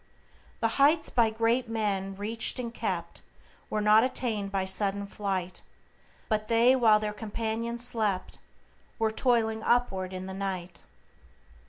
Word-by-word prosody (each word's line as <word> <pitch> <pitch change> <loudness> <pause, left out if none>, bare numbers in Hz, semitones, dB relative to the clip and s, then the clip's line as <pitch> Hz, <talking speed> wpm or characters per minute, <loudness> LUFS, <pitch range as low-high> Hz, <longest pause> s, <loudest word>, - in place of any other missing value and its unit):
"The 225 - +3
heights 310 +3 +5
by 230 -2 +3
great 230 +2 0
men 200 -3 -2
reached 220 +5 0
and 235 -2 -4
kept, - - -4 0.5
Were 215 - -1
not 210 +1 +5
attained 225 -6 -2
by 195 -1 -1
sudden 195 +1 0
flight, 190 -3 -4 0.7
But 215 -1 -1
they, 235 +3 +4
while 225 -4 +5
their 210 0 -3
companions 225 +2 -3
slept, 215 -6 -1 0.6
Were 220 -1 +1
toiling 220 -2 +1
upward 195 -7 0
in 185 0 -6
the 190 - -6
night." 185 -3 -5
220 Hz, 135 wpm, -28 LUFS, 195-230 Hz, 0.7 s, heights